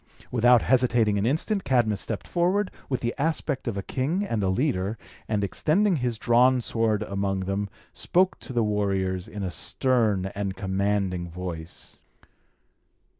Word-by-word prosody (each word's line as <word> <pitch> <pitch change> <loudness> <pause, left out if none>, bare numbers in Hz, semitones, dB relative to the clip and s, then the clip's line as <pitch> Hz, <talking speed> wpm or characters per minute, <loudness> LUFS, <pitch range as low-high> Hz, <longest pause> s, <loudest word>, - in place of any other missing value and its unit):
Without 120 0 +5
hesitating 120 -5 +3
an 105 - +1
instant, 185 - 0
Cadmus 120 -6 +1
stepped - - -4
forward, 185 +3 +1 0.2
with 130 - -1
the 120 0 -1
aspect 145 -3 -1
of 110 -4 -2
a 100 - -3
king 150 - -1
and 115 - -1
a 95 - +1
leader, 105 -2 0 0.3
and 105 -2 0
extending 170 - +2
his 120 -3 -1
drawn 125 +3 +4
sword 115 -3 0
amongst 95 -1 -2
them, 100 +1 -2 0.2
spoke 185 +1 +1
to - - -8
the 120 -2 +1
warriors 95 -3 0
in 105 -1 -6
a 95 - -2
stern 110 - +1
and 100 -1 -3
commanding 95 -2 -1
voice. 85 -1 -7
110 Hz, 150 wpm, -26 LUFS, 95-130 Hz, 0.3 s, Without